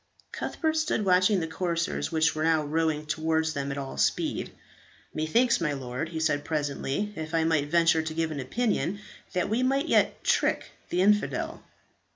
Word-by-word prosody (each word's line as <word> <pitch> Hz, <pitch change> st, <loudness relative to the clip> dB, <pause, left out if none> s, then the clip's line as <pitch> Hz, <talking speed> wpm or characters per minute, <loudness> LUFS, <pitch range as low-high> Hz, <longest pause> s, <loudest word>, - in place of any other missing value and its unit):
Cuthbert 315 Hz, -1 st, -2 dB
stood 310 Hz, -9 st, 0 dB
watching 185 Hz, +1 st, +4 dB
the 165 Hz, -, -2 dB
corsairs, 170 Hz, +1 st, -2 dB
which 160 Hz, -1 st, +2 dB
were 155 Hz, -, -2 dB
now 160 Hz, -1 st, +3 dB
rowing 155 Hz, 0 st, 0 dB
towards 160 Hz, +1 st, 0 dB
them 140 Hz, -1 st, -3 dB
at 140 Hz, -, -4 dB
all 135 Hz, -1 st, -5 dB
speed. -, -, 0 dB, 0.6 s
"Methinks, 230 Hz, +10 st, +2 dB
my 150 Hz, -3 st, 0 dB
lord," 130 Hz, +3 st, -4 dB
he 165 Hz, -1 st, -4 dB
said, 150 Hz, -2 st, +1 dB
presently, 150 Hz, +6 st, -2 dB
"if 160 Hz, +1 st, -4 dB
I 165 Hz, -, +3 dB
might 160 Hz, -3 st, +1 dB
venture 165 Hz, 0 st, +4 dB
to 160 Hz, 0 st, -4 dB
give 165 Hz, -1 st, 0 dB
an 145 Hz, -, -4 dB
opinion, 205 Hz, -, -1 dB, 0.3 s
that 180 Hz, -1 st, 0 dB
we 225 Hz, +4 st, 0 dB
might 275 Hz, +4 st, +1 dB
yet -, -, +2 dB
trick -, -, +1 dB, 0.2 s
the 180 Hz, -, +1 dB
infidel." 210 Hz, +1 st, +1 dB
160 Hz, 175 wpm, -27 LUFS, 155-185 Hz, 0.6 s, watching